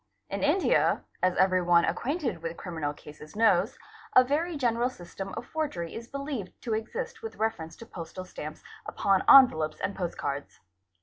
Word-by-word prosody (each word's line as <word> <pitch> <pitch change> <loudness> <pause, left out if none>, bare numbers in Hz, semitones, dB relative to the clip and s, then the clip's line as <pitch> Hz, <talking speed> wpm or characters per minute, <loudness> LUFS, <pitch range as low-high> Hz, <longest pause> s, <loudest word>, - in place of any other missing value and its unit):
in 200 - -2
India, 305 +6 +3 0.2
as 185 -1 +2
every 185 -1 +4
one 175 -1 +4
acquainted 265 - -2
with 165 0 -5
criminal 160 -5 -3
cases 150 +2 -13
knows, 210 -3 +3 0.4
a 255 - +9
very 310 +5 -1
general 240 -2 +1
system 195 -2 -8
of 235 - -5
forgery 260 - -3
is 230 +1 -7
believed 275 -8 -5
to 230 - -3
exist 340 - -4
with 450 - -7
reference 175 -7 -2
to 230 - -11
postal 185 -2 -8
stamps 155 -3 -8 0.2
upon 195 -1 +2
envelopes 160 - +7
and 200 - -2
postcards. 145 -6 -4
200 Hz, 160 wpm, -28 LUFS, 170-255 Hz, 0.4 s, a